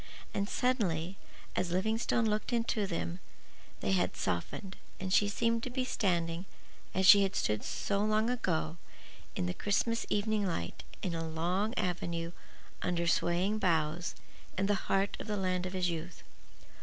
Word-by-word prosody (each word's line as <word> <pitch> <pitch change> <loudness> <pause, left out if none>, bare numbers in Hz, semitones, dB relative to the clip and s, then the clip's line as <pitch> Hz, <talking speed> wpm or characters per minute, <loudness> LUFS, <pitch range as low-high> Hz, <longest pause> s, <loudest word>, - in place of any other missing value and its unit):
And 200 +1 -1
suddenly, 195 -9 +1 0.4
as 185 - 0
Livingstone 220 +5 +1
looked 215 +2 0
into 230 -3 +1
them, 170 0 -3 0.6
they - - 0
had 185 -2 +1
softened, 190 - -2 0.2
and 185 0 -2
she 205 - +5
seemed 230 +2 +1
to 255 - -3
be 255 +1 -1
standing, 175 -6 0 0.5
as 190 - +3
she 200 +2 +10
had 195 -1 +1
stood 105 0 +1
so 200 -1 -1
long 215 +1 +2
ago, 175 -9 0 0.6
in - - 0
the 90 - -1
Christmas 230 - 0
evening 210 0 +1
light 85 - -3 0.2
in 180 - -1
a 165 -1 -2
long 180 +8 0
avenue 170 -2 -1 0.5
under 175 -1 0
swaying 175 +5 +2
boughs, 165 -3 +1 0.4
in 195 - +2
the 205 - +3 0.2
heart 195 +1 +2
of - - -6
the 210 -1 -1
land 185 -1 0
of 185 - -6
his 180 -2 +1
youth. 170 +2 -6
190 Hz, 155 wpm, -32 LUFS, 170-215 Hz, 0.6 s, she